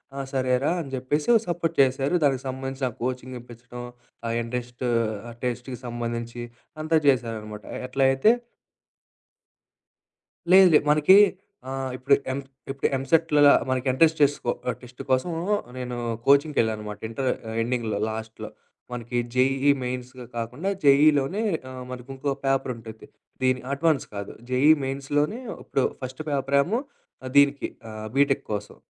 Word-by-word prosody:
"ఆ! 140 Hz, -, -4 dB
సరేరా!" 130 Hz, +3 st, +1 dB
అని 140 Hz, -, -8 dB
జెప్పేసి 145 Hz, +4 st, -1 dB
ఒక 225 Hz, -, +4 dB
సపోర్ట్ 170 Hz, -1 st, -1 dB
చేశారు. 135 Hz, +3 st, +1 dB
దానికి 135 Hz, -2 st, +1 dB
సంబంధించిన 135 Hz, 0 st, -3 dB
కోచింగ్ 125 Hz, 0 st, -3 dB
ఇప్పించడం 120 Hz, +1 st, -10 dB, 0.4 s
ఆ! -, -, -1 dB
ఇంట్రెస్ట్ 125 Hz, +1 st, -5 dB, 0.4 s
ఆ! -, -, -8 dB
టెస్ట్‌కీ 125 Hz, +1 st, -3 dB
సంబంధించి 120 Hz, 0 st, -4 dB, 0.4 s
అంతా 160 Hz, 0 st, +3 dB
చేసారనమాట. 110 Hz, -5 st, 0 dB, 0.2 s
ఎట్లా 135 Hz, +1 st, +1 dB
అయితే 135 Hz, +12 st, +4 dB, 2.2 s
లేదు. 190 Hz, 0 st, +9 dB
లేదు. 150 Hz, -, +4 dB
మనకి 150 Hz, +5 st, +6 dB, 0.5 s
ఆహ్, 135 Hz, 0 st, -3 dB
ఇప్పుడు 135 Hz, +2 st, +3 dB, 0.2 s
ఎమ్ 140 Hz, -, -3 dB, 0.3 s
ఇప్పుడు 135 Hz, -, 0 dB
ఎంసెట్‌లోల 150 Hz, +1 st, +4 dB, 0.2 s
మనకి 130 Hz, +4 st, +3 dB
స్ట్రెస్‌కొ 145 Hz, -5 st, +1 dB, 0.3 s
టెస్ట్ 125 Hz, 0 st, -11 dB
కోసం 130 Hz, +7 st, +1 dB, 0.5 s
నేను 125 Hz, -1 st, -4 dB, 0.3 s
కోచింగ్‌కెళ్ళాను 140 Hz, -5 st, +3 dB
అన్నమాట. 105 Hz, -1 st, -7 dB
ఇంటరు 130 Hz, +3 st, -1 dB, 0.2 s
ఆహ్, 110 Hz, -, -4 dB
ఎండింగ్‌లో 115 Hz, -3 st, -1 dB
లాస్ట్‌లో. 110 Hz, -1 st, -6 dB, 0.4 s
మనకి 120 Hz, 0 st, -4 dB, 0.2 s
జేఈఈ 135 Hz, +2 st, +3 dB
మెయిన్స్‌ 125 Hz, 0 st, -4 dB, 0.3 s
కాకుండా, 125 Hz, +12 st, -3 dB
జేఈలోనే 145 Hz, +5 st, +4 dB, 0.3 s
ఆహ్, 130 Hz, -1 st, -7 dB
మనకు 125 Hz, +1 st, -8 dB
ఇంకో 135 Hz, +1 st, -1 dB
పేపర్ 135 Hz, -1 st, +1 dB
ఉంటుంది. 110 Hz, -1 st, -11 dB, 0.3 s
దీన్ని 130 Hz, 0 st, +2 dB
అడ్వాన్స్ 155 Hz, 0 st, +1 dB
కాదు 100 Hz, 0 st, -5 dB, 0.2 s
జేఈ 135 Hz, +5 st, +5 dB
మెయిన్స్‌లోనే 145 Hz, -, -1 dB, 0.2 s
ఇప్పుడు 135 Hz, -, 0 dB, 0.2 s
ఫస్ట్ 130 Hz, +3 st, -6 dB
పేపరేమో, 140 Hz, -, +1 dB, 0.6 s
దీనికి 140 Hz, 0 st, +4 dB, 0.2 s
ఆహ్, 110 Hz, 0 st, -7 dB
బీటెక్ 140 Hz, 0 st, +3 dB
కోసం 105 Hz, 0 st, -5 dB
130 Hz, 125 wpm, -25 LUFS, 120-140 Hz, 2.2 s, లేదు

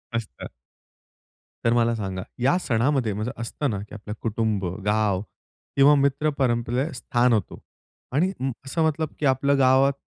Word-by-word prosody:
मस्त. 115 Hz, -4 st, -5 dB, 1.2 s
तर 115 Hz, -, +4 dB
मला 115 Hz, -1 st, +2 dB
सांगा. 95 Hz, -4 st, -4 dB, 0.2 s
या 135 Hz, +8 st, +3 dB
सणामध्ये 125 Hz, -, +1 dB
म्हणजे 110 Hz, +5 st, -3 dB
असतं 135 Hz, +5 st, -2 dB
ना 100 Hz, -4 st, -2 dB
की 100 Hz, +1 st, -10 dB
आपलं 105 Hz, 0 st, -7 dB
कुटुंब, 110 Hz, -3 st, -1 dB, 0.2 s
गाव 105 Hz, -2 st, +1 dB, 0.5 s
किंवा 140 Hz, +2 st, +6 dB
मित्र 140 Hz, +2 st, +2 dB
परंपरेत 125 Hz, +3 st, 0 dB
स्थान 125 Hz, 0 st, +2 dB
होतो. 110 Hz, -, -1 dB, 0.5 s
आणि 165 Hz, +8 st, +2 dB
उं, 130 Hz, +1 st, -1 dB
असं 160 Hz, +4 st, 0 dB
मतलब 155 Hz, 0 st, 0 dB
की 150 Hz, -, -1 dB
आपलं 140 Hz, +1 st, +3 dB
गावात 135 Hz, +1 st, +5 dB
125 Hz, 150 wpm, -24 LUFS, 110-140 Hz, 1.2 s, किंवा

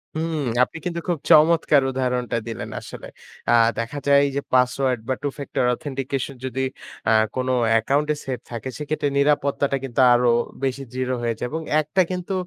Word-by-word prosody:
হুম, 160 Hz, 0 st, -2 dB, 0.2 s
আপনি 145 Hz, -, -4 dB
কিন্তু 170 Hz, -1 st, -2 dB
খুব 175 Hz, -2 st, 0 dB
চমৎকার 155 Hz, -2 st, +5 dB
উদাহরণটা 125 Hz, -2 st, -1 dB
দিলেন 115 Hz, -, -5 dB
আসলে। -, -, -9 dB, 0.4 s
আ -, -, +5 dB, 0.3 s
দেখা 115 Hz, +5 st, -4 dB
যায় 140 Hz, 0 st, +6 dB
যে 140 Hz, -, 0 dB
পাসওয়ার্ড 125 Hz, 0 st, +2 dB
বা -, -, +3 dB
Two 145 Hz, -, -2 dB
factor 140 Hz, -3 st, -2 dB
authentication 135 Hz, 0 st, -4 dB
যদি 130 Hz, 0 st, -3 dB, 0.5 s
আ -, -, +4 dB, 0.2 s
কোন 130 Hz, 0 st, -1 dB, 0.2 s
অ্যাকাউন্ট 135 Hz, +7 st, +2 dB
এ -, -, -5 dB
সেট 130 Hz, -2 st, -3 dB
থাকে 115 Hz, +1 st, -5 dB
সেক্ষেত্রে 150 Hz, 0 st, -2 dB
নিরাপত্তাটা 140 Hz, -1 st, +1 dB
কিন্তু 135 Hz, -1 st, -4 dB
আরো 120 Hz, 0 st, +3 dB, 0.3 s
বেশি 135 Hz, +1 st, -1 dB
দৃঢ় 130 Hz, 0 st, -2 dB
হয়ে 115 Hz, -1 st, -1 dB
যায় 125 Hz, -, -2 dB
এবং 160 Hz, +1 st, -3 dB, 0.2 s
একটা 155 Hz, +5 st, +1 dB
কিন্তু 180 Hz, +1 st, -3 dB
135 Hz, 170 wpm, -23 LUFS, 125-150 Hz, 0.5 s, যায়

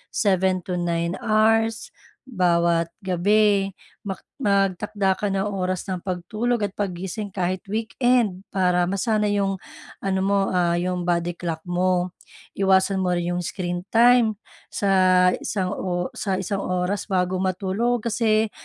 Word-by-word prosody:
7 190 Hz, -3 st, +2 dB
to 180 Hz, -1 st, -3 dB
9 170 Hz, 0 st, -1 dB
hours 225 Hz, +1 st, +2 dB, 0.4 s
bawat 170 Hz, -6 st, +1 dB
gabi, 195 Hz, +2 st, +2 dB, 0.3 s
mak 195 Hz, -2 st, -5 dB, 0.2 s
magtakda 200 Hz, -3 st, +1 dB
ka 205 Hz, -1 st, -2 dB
ng 195 Hz, +1 st, 0 dB
oras 185 Hz, -2 st, -2 dB
ng 185 Hz, -2 st, -4 dB
pagtulog 215 Hz, +6 st, -2 dB
at 205 Hz, -2 st, -3 dB
paggising 195 Hz, +1 st, -4 dB
kahit 185 Hz, -1 st, -2 dB
weekend, 225 Hz, -3 st, +1 dB
para 180 Hz, -2 st, +2 dB
masanay 205 Hz, +2 st, 0 dB
yung, 195 Hz, -1 st, 0 dB, 0.5 s
ano 190 Hz, -1 st, 0 dB
mo, 195 Hz, 0 st, +1 dB
ah, 175 Hz, -2 st, +2 dB
yung 180 Hz, 0 st, -2 dB
body 175 Hz, 0 st, +1 dB
clock 165 Hz, -2 st, -4 dB
mo. 180 Hz, 0 st, 0 dB, 0.4 s
Iwasan 190 Hz, 0 st, +3 dB
mo 180 Hz, -1 st, +1 dB
rin 175 Hz, 0 st, -1 dB
yung 175 Hz, -, -1 dB
screen 175 Hz, +1 st, -4 dB
time 235 Hz, 0 st, +4 dB, 0.3 s
sa, 185 Hz, -2 st, +3 dB
isang 185 Hz, -3 st, -2 dB
o 180 Hz, -1 st, -3 dB
sa 195 Hz, -3 st, -2 dB
isang 195 Hz, +1 st, -2 dB
oras 180 Hz, +2 st, -1 dB
bago 185 Hz, -2 st, 0 dB
matulog, 195 Hz, +6 st, 0 dB
kasi 215 Hz, -1 st, +2 dB
190 Hz, 135 wpm, -23 LUFS, 180-205 Hz, 0.5 s, time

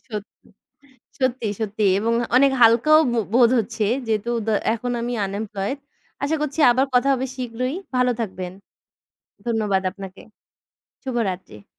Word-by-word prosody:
সত্যি, 210 Hz, -1 st, -8 dB, 0.7 s
সত্যি, 255 Hz, -3 st, 0 dB
সত্যি 215 Hz, 0 st, -2 dB
এবং 225 Hz, +3 st, 0 dB, 0.2 s
অনেক 275 Hz, +1 st, +5 dB
হালকাও 235 Hz, +7 st, +6 dB
বো 240 Hz, -, 0 dB, 0.2 s
বোধ 240 Hz, -1 st, +6 dB
হচ্ছে। 225 Hz, 0 st, -3 dB, 0.2 s
যেহেতু 220 Hz, +1 st, -1 dB, 0.2 s
দ -, -, -5 dB, 0.3 s
এখন 245 Hz, +2 st, -4 dB
আমি 240 Hz, +1 st, -3 dB
আনএমপ্লয়েড 200 Hz, +4 st, -4 dB, 0.5 s
আশা 310 Hz, +3 st, 0 dB
করছি 300 Hz, +1 st, -2 dB
আবার 260 Hz, +3 st, +2 dB
কথা 250 Hz, +2 st, +3 dB
হবে 265 Hz, 0 st, -1 dB
শীঘ্রই। 255 Hz, +1 st, -3 dB, 0.2 s
ভালো 250 Hz, 0 st, +3 dB
থাকবেন। 185 Hz, -4 st, -4 dB, 1.0 s
ধন্যবাদ 210 Hz, -4 st, +1 dB
আপনাকে। 195 Hz, 0 st, -10 dB, 0.8 s
শুভরাত্রি। 195 Hz, -, -4 dB
230 Hz, 125 wpm, -22 LUFS, 205-255 Hz, 1.0 s, হালকাও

